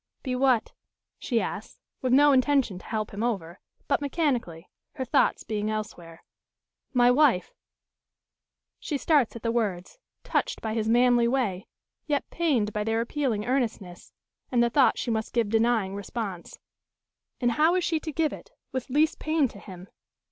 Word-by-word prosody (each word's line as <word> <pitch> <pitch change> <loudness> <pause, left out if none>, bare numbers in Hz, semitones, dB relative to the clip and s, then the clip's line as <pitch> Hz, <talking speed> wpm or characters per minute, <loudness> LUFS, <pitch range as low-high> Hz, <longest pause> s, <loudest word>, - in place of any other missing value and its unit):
"Be 255 -2 -2
what?" 255 -3 +2 0.5
she 235 -3 0
asks, - - -5 0.2
with 255 - 0
no 290 +3 +6
intention 265 -7 +2
to - - -16
help 215 -2 -3
him 200 - -5
over, 195 -8 -3 0.3
but 285 - +1
mechanically, 255 - -2 0.3
her 260 -3 -4
thoughts 245 - +2
being 210 -1 -2
elsewhere. 180 -6 -6 0.7
"My 245 -2 +4
wife?" 250 -8 +3 1.3
She 295 - -3
starts 280 -5 +2
at 230 - -9
the 230 - 0
words, 210 - -2 0.2
touched - - -1
by 220 -1 -3
his 220 -1 -1
manly 240 0 +4
way, 230 -8 -1 0.4
yet 290 -2 -1
pained 265 -11 0
by 210 - -1
their 225 +1 0
appealing 235 -3 -1
earnestness, 225 -8 -3 0.4
and 240 -2 +3
the 235 - +1
thought 275 0 +4
she 240 - -2
must 220 -1 -2
give 230 -3 +1
denying 225 -3 +1
response. 200 -2 -6 0.8
And 245 -1 +2
how 315 +8 +3
is 365 - +1
she 330 -2 0
to 315 - -6
give 310 +1 0
it, - - -11 0.2
with 260 -1 -4
least 305 +5 +2
pain 310 -3 +1
to 200 - -13
him? 185 -1 -11
235 Hz, 160 wpm, -26 LUFS, 210-275 Hz, 1.3 s, no